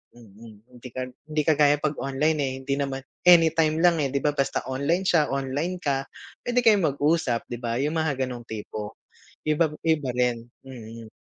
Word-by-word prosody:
mm. 110 -1 -15 0.2
Hindi 125 - -9
ka 130 - -3 0.3
hindi 155 0 0
kagaya 145 -2 +4
pag 150 -1 -1
online, 150 +3 0
eh, 135 -2 0
hindi 140 +1 -1
naman 135 -1 -3 0.2
anytime 165 -2 +6
lang, 175 -2 +4
eh, 145 - +1
'di 140 +1 -2
ba, 150 - +3
basta 140 -2 -1
online 145 +8 0
siya, 165 -5 +3
online 145 +7 -3
ka, 135 -1 -1 0.4
pwede 245 0 +2
kayong 210 -6 +5
mag-usap, 145 -5 +1
'di 120 - -4
ba, 115 -1 -2
yung 155 +3 0
mga 145 -4 0
ganong 125 -2 -6
tipo, 105 -1 -6 0.5
iba 155 +1 +2 0.2
iba 160 -4 +1
rin, 120 -1 0 0.2
mm. 115 -3 -10
140 Hz, 175 wpm, -25 LUFS, 125-160 Hz, 0.5 s, anytime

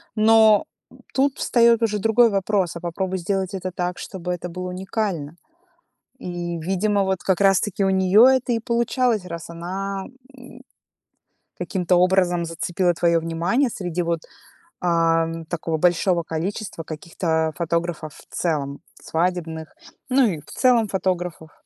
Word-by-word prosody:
Но, 220 +2 +5 0.3
м, - - -18
тут 270 +1 +1
встаёт 235 -1 +4
уже 210 -2 +1
другой 225 +3 +4
вопрос: 195 -3 0
а - - -7
попробуй 185 +2 -3
сделать 190 +1 -2
это 185 -1 -4
так, 180 0 -3
чтобы 180 -2 -5
это 180 0 -5
было 180 +1 -5
уникально. 185 -5 -3 0.8
И, 175 -1 -4
видимо, 195 +4 0
вот 190 -1 -1
как 190 -1 +1
раз 195 -1 +5
таки 200 -1 -1
у 190 - +2
неё 190 +5 +5
это 260 -2 +2
и 230 - 0
получалось, 235 -3 0
раз 170 -2 -7
она, 190 +3 -4 0.3
м, 250 -1 -13 1.0
каким-то 180 -3 0
образом 180 -1 +2
зацепила 175 +2 0
твоё 170 0 +2
внимание 170 - 0
среди 180 -4 -3
вот, 170 -1 -1 0.6
ам, 165 -1 +1
такого 160 -1 -3
большого 175 +1 +2
количества 170 +2 -4
каких-то 160 0 -2
фотографов 170 -2 -2
в - - -16
целом, 145 -4 -2 0.2
свадебных, 160 -2 -2 0.4
ну 260 0 +4
и 160 -7 -3
в - - -23
целом 240 -4 +3
фотографов. 180 -4 -2
180 Hz, 140 wpm, -22 LUFS, 170-205 Hz, 1.0 s, Но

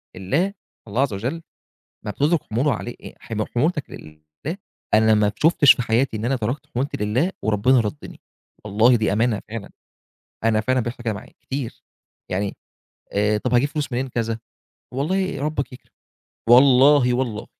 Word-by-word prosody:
الله 145 - 0 0.3
الله- 115 +6 0
عز 135 -7 +1
وجل- 110 +6 -2 0.8
لمّا 105 - -2
بتترك 150 +7 +1
حموله 125 +5 0
علي 120 +2 -5
أأ - - -9
حم 110 -2 -3
حمولتك 150 +4 -1
لله، 75 - -9 0.4
أنا 110 +1 +5
ما 105 -1 +3
شُفتش 150 -3 +6
في - - -3
حياتي 115 +1 +1
إن 110 - -4
أنا 135 +2 +1
تركت 125 +6 -3
حمولتي 135 +4 -1
لله 130 - +1
وربنا 110 +4 +3
رَدِّني، 115 +6 -5 0.4
والله 110 +4 +4
دي 110 -3 +1
أمانة 110 -1 +1
فعلًا، 115 -2 -6 0.7
أنا 110 -1 +3
فعلًا 130 +3 +1
بيحصل 120 +1 -4
كده 110 -2 -1
معايا 110 +5 -10
كتير، 135 -3 -5 0.5
يعني 100 +2 -1 0.6
آآ، 105 +1 +2
طَب 125 +3 -2
هاجيب 125 +4 +3
فلوس 145 -2 -3
منين 125 +2 -1
كذا، 115 -2 -2 0.6
والله 185 +2 -1
ربك 150 -3 -2
يكرم، 125 - -14 0.6
والله 130 +1 +6
والله 120 -4 -2
120 Hz, 155 wpm, -22 LUFS, 110-140 Hz, 0.8 s, شُفتش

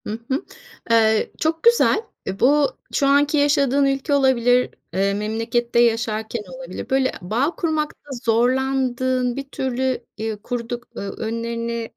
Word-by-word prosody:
Hı 215 +2 -4
hı. 270 +3 -1 0.5
Eee, 220 -1 +3
çok 320 +1 -1
güzel. 470 -2 +4 0.4
Bu, 285 +2 +4 0.3
şu 275 - +2
anki 285 +2 +3
yaşadığın 280 -1 +3
ülke 275 +2 0
olabilir, 250 -3 +3 0.2
eee, 195 +2 +1
memlekette 225 +3 -1
yaşarken 225 -1 +1
olabilir. - - -8
Böyle, 265 0 +2
bağ 240 - -1
kurmakta 310 -3 -2 0.2
zorlandığın, 255 +1 +1
bir 275 0 -6
türlü, 260 -1 -2
eee, 220 0 -3
kurduk, 240 0 -4
eee, - - -5
önlerine, 230 +2 -4
245 Hz, 125 wpm, -22 LUFS, 230-275 Hz, 0.5 s, güzel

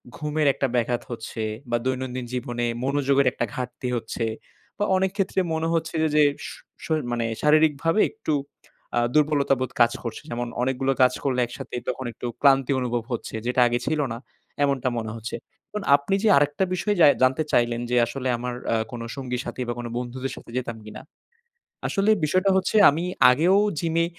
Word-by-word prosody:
ঘুমের 150 0 -1
একটা 135 - -1
ব্যাঘাত 120 0 0
হচ্ছে 115 0 -6 0.3
বা 120 - +2
দৈনন্দিন 130 -1 -2
জীবনে 120 -1 -2 0.2
মনোযোগের 140 0 +2
একটা - - -2
ঘাটতি 125 0 -5
হচ্ছে। 115 0 -3 0.5
বা 205 - 0
অনেক 190 0 +1
ক্ষেত্রে 195 -1 0
মনে 160 0 -1
হচ্ছে 165 0 -1 0.2
যে 150 - +6 0.2
শ - - -6 0.3
শ - - -7 0.2
মানে 120 -1 -1 0.2
শারীরিকভাবে 155 +4 +3
একটু 220 -8 -3 0.6
আ - - +5
দুর্বলতাবোধ 140 -4 +2
কাজ 120 - +6
করছে। 115 - -5
যেমন 120 -1 -3
অনেকগুলো 130 +1 0
কাজ 125 - +4
করলে 130 -2 0
একসাথে 120 - -10
একটু 120 -1 -5
ক্লান্তি 135 -2 +4
অনুভব 120 -2 -1
হচ্ছে। 120 - -4
যেটা 125 +1 +2
আগে 120 0 0
ছিল 155 - 0
না। - - -5 0.5
এমনটা 135 -3 +1
মনে 110 -2 -3
হচ্ছে। 115 0 -6 0.3
এখন 210 -1 -5
আপনি 145 +7 0
যে - - +3
আরেকটা 145 +5 +2
বিষয় 205 +3 0
জাই 145 - +9
জানতে 130 +4 +3
চাইলেন। 120 0 +2
যে 125 - +1
আসলে 130 +2 -4
আমার 125 +1 -4 0.2
আ - - +3 0.2
কোন 120 -2 -6
সঙ্গীর 125 -3 -3
সাথী - - -5
বা - - 0 0.2
বন্ধুদের 125 +2 -4
সাথে - - -12
যেতাম 120 -2 -3
কিনা। - - -9 0.9
আসলে 200 +1 +2
বিষয়টা 185 +5 +2
হচ্ছে, 190 +3 -1
আমি 160 +5 -1 0.3
আগেও 170 +9 +3 0.2
জিমে 165 +1 +1
130 Hz, 170 wpm, -24 LUFS, 120-155 Hz, 0.9 s, জাই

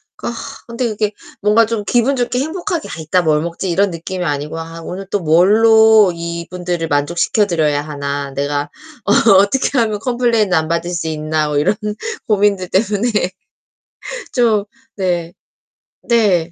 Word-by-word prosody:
그러니까 235 -1 -5 0.3
근데 235 +1 -3
이게 215 -1 -1 0.3
뭔가 210 +2 +4
좀 225 -1 -3
기분 245 +6 +2
좋게 250 0 -1
행복하게 345 +3 -3
'아 - - -6
이따 160 +3 +1
뭘 155 -2 +2
먹지?' 170 +3 -4
이런 195 +3 +2
느낌이 180 +2 -5
아니고 150 0 -3
'아 165 0 -8
오늘 190 +4 -6
또 205 - +1
뭘로 215 +5 +5
이분들을 170 0 -4
만족시켜 170 +8 +1
드려야 150 -4 +1
하나 140 -1 -4
내가 145 +1 -2 0.4
어 225 - +4
어떻게 205 +8 +3
하면 215 -3 0
컴플레인을 235 -4 +1
안 160 - 0
받을 170 +1 -1
수 170 -2 -3
있나.' 155 0 -1
뭐 145 - -1
이런 150 +8 +2 0.5
고민들 200 -3 +1
때문에 210 +4 +1 1.2
좀 225 -5 +2 0.3
네. 175 -3 -1 0.7
네. 195 -8 +2
185 Hz, 300 characters per minute, -17 LUFS, 160-220 Hz, 1.2 s, 뭘로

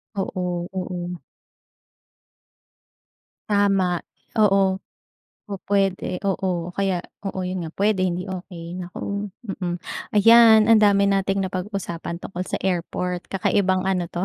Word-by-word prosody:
Oo, 180 -2 -2
oo. 180 -1 -4 2.3
Tama, 195 -4 +2 0.3
oo 195 -3 +4 0.7
pupwede, 195 -2 -1
oo 180 -3 -1
kaya 195 -1 0 0.3
oo 190 -1 -4
'yon 185 0 -3
nga, 160 - -5
puwede 205 -1 +2
hindi 180 +1 -3
okey 180 -3 -7
naku, 200 +3 -4 0.3
mm. 175 0 -1 0.4
Ayan, 225 0 +8
ang 225 -1 +6
dami 200 -1 +5
nating 195 0 +1
napag-usapan 185 -3 -4
tungkol 180 0 -5
sa - - -1
airport, 180 0 -2
kakaibang 190 0 +1
ano 180 -3 0
'to, 175 +2 -2
190 Hz, 110 wpm, -23 LUFS, 180-200 Hz, 2.3 s, Ayan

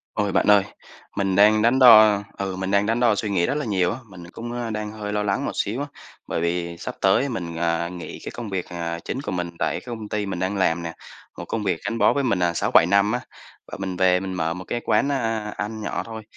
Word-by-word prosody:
Ôi 105 -2 0
bạn - - +2
ơi, 105 -1 +7 0.5
mình 95 -1 0
đang 105 +1 +5
đắn 120 +4 +3
đo 110 -5 +8 0.2
ừ, 95 -1 -3
mình 95 0 -3
đang 100 +1 +3
đắn 115 +2 0
đo 120 -3 +4
suy 105 +1 -2
nghĩ 85 -3 +2
rất - - -1
là 150 0 -2
nhiều 95 -3 +1
á, 120 - -5
mình 90 -2 -11
cũng, 120 +4 -7
a, 120 -1 -3
đang 105 -1 -4
hơi 105 -1 -5
lo 105 0 0
lắng 100 -1 -1
một - - -2
xíu 115 +6 -2
á, 145 - -2 0.4
bởi - - -2
vì 85 0 -2
sắp 125 - -6
tới 95 +8 +3
mình, 85 -9 -5
à, 85 0 0
nghỉ 90 -1 -8
cái - - -5
công 115 -3 -6
việc, 95 -2 -3
à, 85 -1 -4
chính 130 - -3
của - - -4
mình 90 -1 -2
tại - - 0
cái - - -21
công 110 -3 -6
ty 105 -1 -2
mình 95 -2 -4
đang 95 +3 -1
làm 85 -3 +1
nè, 85 -1 -5 0.5
một - - -5
công 115 - -3
việc 90 -4 0
gắn 115 - -2
bó 105 - +5
với 140 -1 0
mình, 115 -7 +1
à, 85 -1 +1
6-7 85 - +4
năm 100 +3 +3
á, 125 - -1 0.5
và - - -8
mình 95 -1 -4
về 90 0 +3
mình 95 -1 -4
mở 80 -2 -1
một 90 +1 -8
cái 120 - -3
quán, 140 - +2
a, 115 -5 -2
ăn 110 +1 -4
nhỏ - - -3
thôi. 110 -1 -7
100 Hz, 270 wpm, -23 LUFS, 90-110 Hz, 0.5 s, đo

